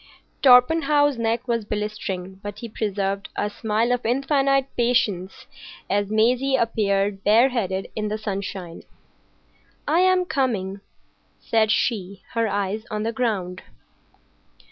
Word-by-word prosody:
Torpenhow's 290 +1 +5
neck 230 +2 -1
was 230 -2 0
blistering, 205 -3 -4
but 205 0 -7
he 235 - -7
preserved 200 -2 -3
a 210 - -2
smile 220 +3 0
of 245 0 0
infinite 275 +2 +2
patience 210 -6 0 0.5
as 200 0 +1
Maisie's 250 +5 +2
appeared 200 -3 0
bareheaded 215 -4 +2
in 215 -1 -2
the 210 +1 -2
sunshine. 195 -4 -5 1.1
"I 315 +4 +3
am 370 0 +3
coming," 205 - -1 0.6
said 220 -1 +1
she, 200 -4 -1
her 230 -1 +1
eyes 205 +1 -2
on 210 -1 -3
the 230 +1 -2
ground. 195 -7 -2
220 Hz, 120 wpm, -23 LUFS, 200-245 Hz, 1.1 s, Torpenhow's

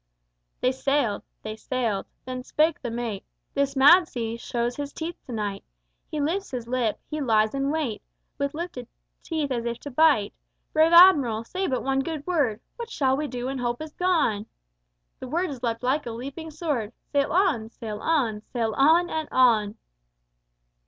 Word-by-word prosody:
They 255 - +3
sailed. 265 -5 0 0.2
They 215 0 -5
sailed. 225 -3 -2 0.2
Then 255 0 -4
spake 310 +5 +1
the 245 - -3
mate: 230 -4 -4 0.3
"This 280 0 0
mad 320 +6 +7
sea 230 -4 -3
shows 235 +1 -2
his 285 -1 -5
teeth 335 +1 -4
to - - -7
night. 205 -3 -3 0.5
He 305 - -3
lifts 350 +7 -1
his 245 -3 -5
lip, 240 -3 0
he 305 0 -4
lies 220 -4 +2
in 275 0 0
wait, 290 -8 -2 0.4
With 280 +1 -1
lifted 315 -8 -5 0.3
teeth, 310 -4 -2
as 240 -2 -1
if 235 0 -3
to 285 - -7
bite! 275 -7 +4 0.4
Brave 315 +1 +5
Admiral, 290 -11 +7
say 375 +10 -3
but 255 - -1
one 270 0 +1
good 300 +1 -3
word: 280 -12 0 0.2
What 470 -1 -6
shall 265 - +1
we 300 +2 -2
do 245 -2 -5
when 265 0 -3
hope 240 -1 -1
is 310 -1 -7
gone?" 315 - +1 0.7
The 260 - -7
words 310 -3 -2
leapt 230 -1 -2
like 270 +2 0
a - - -3
leaping 275 +7 -7
sword: 290 -9 -3 0.2
"Sail 285 -1 +1
on! 320 - +2
sail 215 -2 -7
on! 235 -8 +1
sail 225 -3 0
on! 325 +6 +5
and 315 -2 -3
on!" 225 -5 +4
265 Hz, 175 wpm, -25 LUFS, 235-310 Hz, 0.7 s, mad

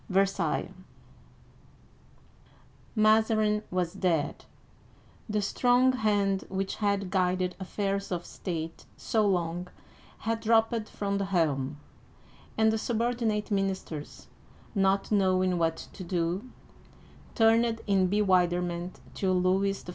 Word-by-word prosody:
VERSAILLES 195 0 +1 2.2
MAZARIN 215 -1 +3
was 180 -1 -1
dead! 175 -6 -1 0.8
The 210 -1 0
strong 245 +5 +3
hand 205 -5 +1
which 195 0 -3
had 200 -3 0
guided 185 -1 +1
affairs 195 +1 -2
of 175 -1 -3
state 165 -3 -6
so 215 -2 +1
long 175 -1 -1 0.5
had 225 +1 -1
dropped 225 0 +2
from 200 -1 -2
the 200 - -1
helm, 150 -7 0 0.8
and 220 0 +4
the 220 - 0
subordinate 230 -2 -1
ministers, 190 -6 -3 0.5
not 195 -1 +1
knowing 185 -3 +2
what 165 -1 +1 0.2
to 185 - -8
do, 180 +5 -2 0.9
turned 225 0 +3
in 195 -2 +3
bewilderment 180 -3 +1
to 190 -2 0
Louis 190 +2 +1
XIV. - - -11
195 Hz, 105 wpm, -28 LUFS, 180-215 Hz, 2.2 s, and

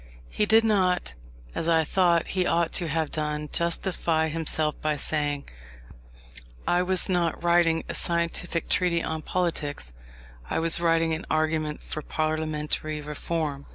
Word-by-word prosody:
He 210 - 0
did 225 +1 +6
not, 185 - +1 0.4
as 165 - -1
I 160 -1 +4
thought 170 0 +2
he 185 -1 0
ought 170 -1 +1
to 175 - -1
have 160 0 -1
done, 150 -1 -3
justify 170 -2 0
himself 155 -1 -1
by 155 -1 0
saying, 145 -1 0 1.2
"I 175 - +3
was 185 0 +2
not 175 -3 0
writing 170 -1 +3
a - - -4
scientific 170 0 -1
treatise 175 -2 +2
on 160 0 -3
politics, 150 - -2 0.6
I - - -1
was 165 +1 +4
writing 165 -1 +2
an 160 +3 -4
argument 155 -1 0
for 155 - -5
parliamentary 155 0 -2
reform." 150 -1 -4
165 Hz, 140 wpm, -26 LUFS, 155-170 Hz, 1.2 s, did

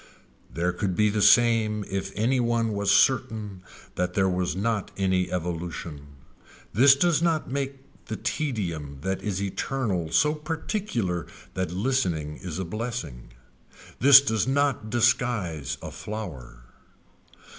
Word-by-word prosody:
There 85 +2 0
could 90 +1 -2
be 105 +1 +3
the 105 0 -1
same 110 -3 +4
if 95 0 -3
any 120 +5 +1
one 115 -2 +1
was 100 -1 -1
certain 110 -6 +2 0.3
that 90 0 -2
there 95 -2 +1
is 90 -3 -2
not 105 +1 -1
any 95 -2 0
evolution. 85 -4 -5 0.7
This 135 +6 +7
does 165 +2 +2
not 165 -6 0
make 140 0 -2 0.3
the 110 - -3
tedium 85 - -3
that 95 +4 -2
is 100 -3 -2
eternal 100 - -2
so 150 - +3
particular 155 - -3 0.3
that 95 -2 -2
listening 90 - -1
is 90 -4 -6
a 95 - -3
blessing. 85 - -5 0.7
This 140 +1 +9
does 110 -5 0
not 135 -5 0
disguise 115 - 0
a - - -6
flower. 80 - -8
105 Hz, 130 wpm, -26 LUFS, 90-125 Hz, 0.7 s, This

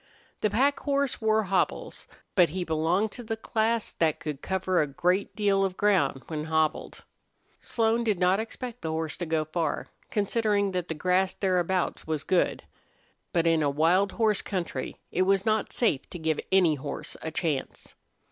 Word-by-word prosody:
The 215 - +1
pack 270 +8 +2
horse 280 -3 -1
wore 220 0 +3
hobbles, 195 -1 -1 0.3
but 180 -4 +5
he 180 +3 -3
belonged 170 +6 +1
to 245 - -9
the 225 0 -3
class 225 0 0
that 155 -2 +1
could 150 -4 -5
cover 185 -2 0
a 150 - 0
great 180 +7 0
deal 200 -2 +2
of 190 -1 -2
ground 175 -10 +2
when 155 -2 -4
hobbled. 160 -1 -1 0.6
Slone 230 0 +1
did 215 -4 +1
not 180 +2 +3
expect 235 +2 -6
the 160 - -3
horse 160 -1 -2
to 175 - -4
go 160 -1 0
far, 155 0 -2 0.2
considering 205 -1 +1
that 180 -2 -2
the 160 - -3
grass 185 +3 +1
thereabouts 185 -2 0
was 155 -2 -1
good. 185 +1 +1 0.7
But 170 -2 +1
in 165 -1 +3
a 145 - +2
wild 170 +7 +2
horse 220 -3 +2
country 170 -9 -4
it 185 - 0
was 195 +1 +2
not 215 -1 +1
safe 160 - 0
to - - -7
give 160 -2 -1
any 185 -4 +5
horse 140 0 -6
a 160 - -3
chance. 155 -4 -3
185 Hz, 175 wpm, -27 LUFS, 160-210 Hz, 0.7 s, but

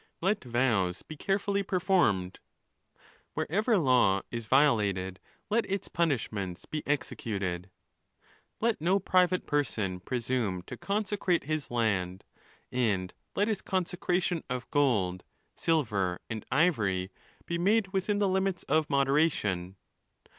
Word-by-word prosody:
Let 195 +4 0
vows 115 -8 +1
be 155 - -9
carefully 200 +4 0
performed. 175 - +1 1.0
Where - - 0
ever 215 +4 +3
law 125 - +3
is 115 -2 -4
violated 105 -9 +2 0.3
let 230 0 +1
its 195 0 -2
punishments 110 - -1
be 155 - -4
executed. 100 -11 -2 0.9
Let 230 -6 +1
no 180 +4 +3
private 185 -1 +2
person 110 - -1
presume 115 -4 -2
to - - -8
consecrate 200 -3 0
his 155 0 -2
land; 100 -6 0 0.5
and 100 -8 0 0.2
let 205 - +2
his 215 -4 -1
consecration 180 -2 -1
of 125 0 -3
gold, 100 -11 +2 0.3
silver,.and 110 - -1
ivory, 105 - +2 0.3
be 170 0 -2
made 200 +2 +3
within 195 +2 0
the 205 -1 +2
limits 190 -1 0
of 155 -1 +1
moderation. 135 - +1
140 Hz, 115 wpm, -29 LUFS, -, 1.0 s, ever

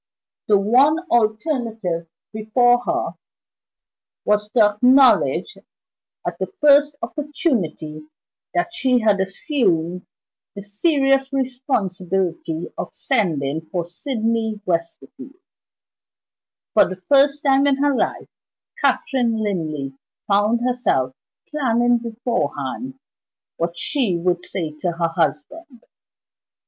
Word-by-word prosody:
The 210 - +5
one 255 +10 +4
alternative 220 - 0 0.3
before 245 +3 +3
her - - -1 1.1
was 210 0 +1
to 230 - +5
acknowledge 255 - +4 0.7
at - - -4
the - - -2
first 290 0 +5
opportunity 230 - -3 0.5
that 350 0 0
she 255 -7 +2
had 210 -3 +3
assumed 185 - -1 0.5
the 200 - -7
serious 270 - +1
responsibility 190 - -2
of - - -6
sending 160 - -1
for 175 -2 -2
Sydney 225 +2 -2
Westerfield. 170 - -4 1.4
For - - +5
the 185 - -5
first 280 - +2
time 275 0 +3
in 280 - +3
her 285 0 +1
life, - - -1 0.5
Catherine 240 -4 +1
Linley 160 -10 -3 0.3
found 210 +4 +2
herself 245 - 0 0.3
planning 240 -4 +1
beforehand 230 - -3 0.6
what 170 +1 -2
she 235 - 0
would 175 +1 -1
say 165 -5 -3
to 175 +2 -1
her 165 0 -1
husband. 235 - -3
225 Hz, 100 wpm, -21 LUFS, 175-270 Hz, 1.4 s, The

